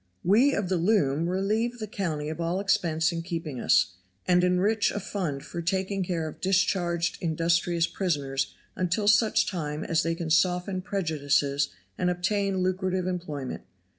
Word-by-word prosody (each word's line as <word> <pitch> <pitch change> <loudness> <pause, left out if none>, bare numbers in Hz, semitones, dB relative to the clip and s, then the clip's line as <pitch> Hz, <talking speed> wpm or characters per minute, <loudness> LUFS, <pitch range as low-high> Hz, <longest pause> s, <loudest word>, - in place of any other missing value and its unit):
We 235 +10 +4
of 200 -2 -1
the 185 0 +1
loom 170 -4 +2
relieve 215 +6 0
the 220 - -4
county 165 -8 -3
of 160 +2 -5
all 170 +3 0
expense 165 -5 +1
in 165 -1 -3
keeping 165 -6 -5
us, 90 +1 +3 0.3
and 180 -1 +4
enrich 195 +4 +2
a - - -3
fund 165 -10 -4
for 170 - -5
taking 190 +3 -1
care 170 -3 -2
of 155 - -9
discharged 180 -2 +1
industrious 165 +1 +1
prisoners 145 -8 -2 0.2
until 185 +3 0
such 220 +2 +4
time 155 -4 -3
as 165 -1 +1
they 165 0 -1
can 165 -1 -4
soften 180 +2 +2
prejudices 145 -6 0 0.3
and 180 - +2
obtain 190 +1 0
lucrative 185 0 0
employment. 155 -8 -4
180 Hz, 155 wpm, -27 LUFS, 160-190 Hz, 0.3 s, We